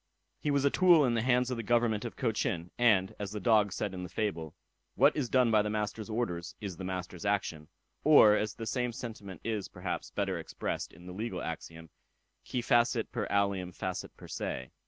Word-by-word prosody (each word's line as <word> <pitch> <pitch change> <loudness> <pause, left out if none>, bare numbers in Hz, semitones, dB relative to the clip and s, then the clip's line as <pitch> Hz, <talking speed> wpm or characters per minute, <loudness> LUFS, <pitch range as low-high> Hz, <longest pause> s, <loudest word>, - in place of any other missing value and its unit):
He 150 - -2
was 140 -1 +2
a 140 - +4
tool 175 -5 +6
in 120 - +1
the 115 - +1
hands 125 +1 +2
of 125 - -2
the - - -2
government 115 -1 +1
of 120 - -5
Cochin; 105 -7 -1
and, 105 -6 +3
as 100 -1 -4
the 105 - -3
dog 105 -1 +3
said 100 +1 -3
in 90 - -5
the 90 - -6
fable, 85 -5 -3 0.4
"What - - +5
is 135 -6 -1
done 125 -3 +4
by 110 -1 +5
the 105 - -2
master's 105 +1 -3
orders, 95 -7 -3
is 95 -5 -6
the 95 - -7
master's 90 -1 -5
action;" 95 -7 -1 0.4
or, 140 -9 +8
as 105 -2 -1
the 115 - -6
same 125 +1 -1
sentiment 105 -7 -8
is, 110 -4 -2
perhaps, - - -5
better - - -2
expressed - - -4
in 90 +2 -15
the 90 - -8
legal 110 +5 -4
axiom; 80 0 -7 0.6
"Qui 125 - -1
facit 120 -1 +2
per - - -2
alium 100 -3 +1
facit 95 +1 -4
per - - -11
se." 65 0 -4
105 Hz, 205 wpm, -31 LUFS, 95-120 Hz, 0.6 s, or